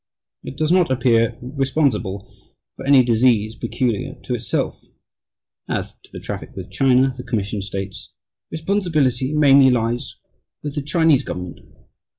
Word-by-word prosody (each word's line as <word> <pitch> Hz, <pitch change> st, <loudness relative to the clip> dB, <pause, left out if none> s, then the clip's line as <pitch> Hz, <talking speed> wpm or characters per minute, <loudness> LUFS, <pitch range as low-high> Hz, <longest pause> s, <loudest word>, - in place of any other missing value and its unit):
It 135 Hz, -, -8 dB
does 155 Hz, +1 st, 0 dB
not 180 Hz, -4 st, +4 dB
appear 120 Hz, -3 st, +2 dB
responsible 130 Hz, -7 st, -1 dB, 0.5 s
for 135 Hz, -, -8 dB
any 135 Hz, -2 st, +6 dB
disease 115 Hz, -2 st, +2 dB
peculiar 130 Hz, +1 st, -2 dB
to 125 Hz, -, -3 dB
itself." 120 Hz, -1 st, -2 dB, 0.9 s
As -, -, -3 dB
to -, -, -19 dB
the -, -, -8 dB
traffic -, -, -7 dB
with -, -, -8 dB
China, 130 Hz, 0 st, +3 dB
the 125 Hz, -, -7 dB
Commission 105 Hz, -4 st, -2 dB
states 95 Hz, 0 st, -6 dB, 0.4 s
"Responsibility 160 Hz, -7 st, 0 dB
mainly 140 Hz, -3 st, +6 dB
lies 120 Hz, 0 st, -1 dB, 0.5 s
with 145 Hz, -1 st, -4 dB
the 145 Hz, -, -2 dB
Chinese 150 Hz, -1 st, +2 dB
government." 90 Hz, 0 st, -6 dB
130 Hz, 135 wpm, -21 LUFS, 115-140 Hz, 0.9 s, any